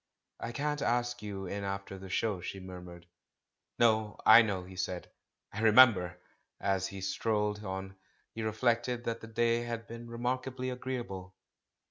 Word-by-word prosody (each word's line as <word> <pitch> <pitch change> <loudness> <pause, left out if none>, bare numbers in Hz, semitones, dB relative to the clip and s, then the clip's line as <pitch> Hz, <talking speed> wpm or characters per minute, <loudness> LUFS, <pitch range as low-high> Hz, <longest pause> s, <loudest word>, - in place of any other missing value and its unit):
"I 115 - -4
can't 150 +3 -1
ask 120 0 0
you 100 -2 -5
in 100 +2 -4
after 100 0 -4
the 95 0 -9
show," 100 -1 0
she 95 - -5
mur 90 -1 -8
mured. 85 -1 -11 0.7
"No, 110 -2 +3
I 110 +2 +10
know," 100 -5 -1
he 95 +1 -11
said 90 -1 -4 0.2
— - - -34
"I 105 - -4
remember!" 110 -6 +6 0.4
As 95 -1 0
he 95 0 -7
strolled 105 +2 0
on, 95 -1 -5 0.4
he 115 - -5
reflected 120 +2 0
that 115 -1 -3
the 115 - -8
day 115 +1 +2
had 115 -1 -4
been 115 0 -9
remarkably 130 +2 -2
agreeable. 120 -8 -5
110 Hz, 160 wpm, -32 LUFS, 95-120 Hz, 0.7 s, I